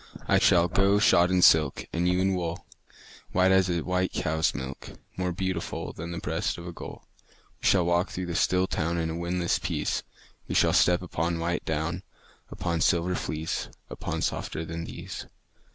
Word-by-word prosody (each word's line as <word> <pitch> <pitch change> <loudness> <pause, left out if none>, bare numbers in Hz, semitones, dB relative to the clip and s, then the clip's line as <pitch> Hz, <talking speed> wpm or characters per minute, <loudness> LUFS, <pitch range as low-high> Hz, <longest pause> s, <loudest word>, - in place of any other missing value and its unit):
I - - +4
shall 85 0 +5
go 95 +3 +3
shod 90 -3 +5
in 90 -1 +3
silk, 75 -4 +5
And 85 +1 +1
you 90 0 +2
in 95 0 +2
wool, 85 -2 -3 0.7
White 95 +1 +4
as 95 -1 +4
a 85 -1 0
white 90 +2 0
cow's 80 -1 0
milk, 65 -1 -6 0.2
More 90 -1 -1
beautiful 95 -1 -3
Than 85 +2 -7
the 85 - -5
breast 80 0 -2
of 85 - -8
a 85 - -5
gull. - - -10 0.5
We - - +1
shall 90 -3 +4
walk 85 +2 +2
through 90 - -4
the 85 - -4
still 90 +2 +2
town 85 -2 -1
In 80 -1 -1
a - - -4
windless 85 0 0
peace; - - -1 0.5
We - - -3
shall - - +4
step 90 0 +4
upon 85 -1 -1
white 85 +1 -2
down, 80 +3 -2 0.5
Upon 85 -3 -2
silver 85 +1 +2
fleece, 80 -2 -3 0.2
Upon - - -4
softer 80 - -2
than 80 +1 -5
these. - - -7
85 Hz, 185 wpm, -27 LUFS, 80-90 Hz, 0.7 s, shall